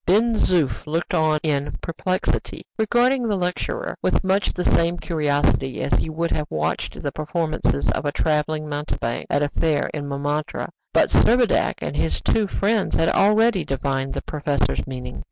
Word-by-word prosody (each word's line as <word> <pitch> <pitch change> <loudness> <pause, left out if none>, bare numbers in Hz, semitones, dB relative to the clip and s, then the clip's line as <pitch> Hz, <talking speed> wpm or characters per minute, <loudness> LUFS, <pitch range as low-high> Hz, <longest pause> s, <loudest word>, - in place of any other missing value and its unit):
Ben 225 +5 +3
Zoof 150 - +1
looked 165 +2 -2
on 155 -1 +2
in 145 -2 -1
perplexity, 185 +3 -2
regarding 240 +3 +2
the 210 - +1
lecturer 185 - -2
with - - +1
much 190 +1 +1
the 180 - -3
same 170 +1 +2
curiosity 145 -5 0
as - - -1
he - - +1
would 165 +2 -2
have 150 -1 -1
watched 75 0 -2
the 140 - -3
performances 155 - -1
of - - -2
a 145 - +1
traveling 155 0 0
mountebank 145 -5 -3
at 145 - +2
a 145 - 0
fair 155 -1 0
in 145 -2 -4
Montmartre; 145 +2 -2 0.2
but - - +3
Servadac 240 0 +3
and - - -3
his - - 0
two 215 -2 +1
friends 205 +1 0
had 165 - +2
already 210 -1 +3
divined 135 0 -2
the - - -3
professor's 145 -2 -1
meaning. 125 -1 -6
155 Hz, 165 wpm, -22 LUFS, 145-190 Hz, 0.2 s, Ben